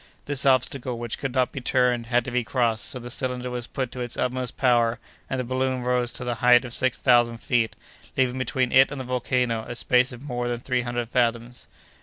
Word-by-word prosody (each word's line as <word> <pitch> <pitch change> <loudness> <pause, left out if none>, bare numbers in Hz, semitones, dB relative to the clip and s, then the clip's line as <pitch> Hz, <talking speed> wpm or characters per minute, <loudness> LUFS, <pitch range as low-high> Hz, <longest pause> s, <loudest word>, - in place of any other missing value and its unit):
This 140 -1 +1
obstacle, 130 -1 +1
which 120 -1 -5
could 135 - -3
not 130 -1 +2
be 135 - -6
turned, 125 -2 +1
had 120 0 +1
to 125 - -5
be 125 0 0
crossed, 115 0 0
so - - -4
the 120 0 -7
cylinder 125 -1 -2
was 120 -1 -4
put 130 -2 -4
to 125 - -8
its 120 -1 -4
utmost 125 -1 -2
power, 120 -2 +3 0.3
and 130 - -2
the - - -1
balloon 130 0 -1
rose 125 -1 0
to - - -5
the 125 0 -1
height 125 +1 +6
of 120 - -4
six 130 -1 +1
thousand 120 -2 +3
feet, 115 -1 0 0.4
leaving 130 -1 +1
between 130 -1 0
it 130 +1 +6
and 145 - -5
the 130 - -5
volcano 125 -2 0
a 120 - -5
space 125 +2 +2
of 125 +1 -10
more 120 -4 -3
than 120 -1 -2
three 125 0 -1
hundred 120 -1 -3
fathoms. 120 0 -1
125 Hz, 225 wpm, -25 LUFS, 120-130 Hz, 0.4 s, height